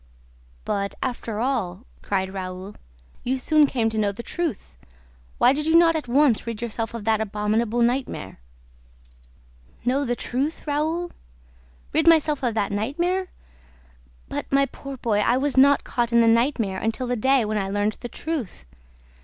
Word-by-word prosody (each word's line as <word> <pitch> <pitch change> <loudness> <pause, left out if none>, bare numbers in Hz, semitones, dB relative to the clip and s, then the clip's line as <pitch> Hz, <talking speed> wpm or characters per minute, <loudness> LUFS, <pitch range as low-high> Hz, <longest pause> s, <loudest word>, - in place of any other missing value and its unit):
"But, 200 0 -2
after 235 -4 -3
all," 230 -5 -2 0.2
cried 190 -1 -2
Raoul, 185 +1 -6 0.5
"you 260 +2 0
soon 300 +3 +4
came 235 -5 0
to 220 - -2
know 205 -1 +2
the 205 +4 -8
truth! 320 - -4 0.6
Why - - +5
did 300 +2 -2
you 320 - +3
not 335 -1 +6
at 310 -5 -3
once 255 -2 +3
rid 230 -2 -4
yourself 230 0 -4
of 230 - -5
that 220 -1 +2
abominable 215 +3 0
nightmare?" 240 - -2 1.5
"Know 265 +3 +2
the 245 -3 -1
truth, 275 +7 -3
Raoul? 315 +4 -1 0.8
Rid 315 +2 +2
myself 310 -3 +4
of 240 -4 -1
that 205 -2 0
nightmare? 345 - -1 1.0
But, - - -5
my 275 0 +4
poor 275 0 -9
boy, 220 -4 0
I 235 +4 +3
was 280 +1 0
not 280 +2 +5
caught 240 -1 -1
in 235 0 +5
the 230 - +4
nightmare 230 -4 +2
until 225 +3 -2
the 245 0 -1
day 265 +1 +3
when 215 0 -1
I 195 -1 -2
learned 205 +2 -1
the 240 - -6
truth! 265 - -5
240 Hz, 160 wpm, -24 LUFS, 210-280 Hz, 1.5 s, not